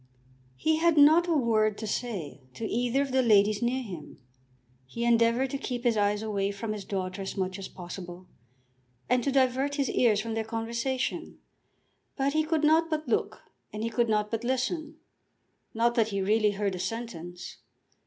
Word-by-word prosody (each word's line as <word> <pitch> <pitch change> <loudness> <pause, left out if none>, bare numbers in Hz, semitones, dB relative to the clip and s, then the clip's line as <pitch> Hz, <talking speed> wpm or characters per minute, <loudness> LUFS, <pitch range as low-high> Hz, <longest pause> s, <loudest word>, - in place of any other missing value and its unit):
He 315 - +1
had 330 -1 +3
not 315 +4 +6
a 340 - +2
word 215 -5 +2
to 220 - -5
say 195 - -4
to 225 - -4
either 245 +5 +1
of 275 - -5
the 260 0 +3
ladies 210 -3 +4
near 250 +2 0
him. 180 -9 -9 0.7
He 235 - -4
endeavoured 235 +2 +3
to 275 - -3
keep 245 -3 -4
his 240 -3 +2
eyes 205 0 +1
away 200 -2 -1
from 210 +2 -4
his 210 -2 -6
daughter 185 -1 -3
as 195 +1 -5
much 185 0 -2
as 195 - -6
possible, 180 0 -9 0.8
and 250 -1 +2
to 280 - 0
divert 265 +1 +2
his 280 -2 0
ears 220 -5 +3
from 225 +1 -3
their 225 0 -1
conversation; 230 +3 -3 0.8
but 275 0 0
he 310 0 +2
could 315 0 0
not 320 +2 +4
but 310 -2 -2
look 235 - -1 0.3
and 215 +1 -5
he 230 - -2
could 235 -1 +1
not 210 -1 +1
but 225 0 -2
listen. 290 +6 -2 0.8
Not 235 +1 +2
that 230 -3 +2
he 200 -2 -2
really 210 +2 +2
heard 200 -1 -1
a 180 - -5
sentence. 180 -6 -6
230 Hz, 185 wpm, -28 LUFS, 205-260 Hz, 0.8 s, not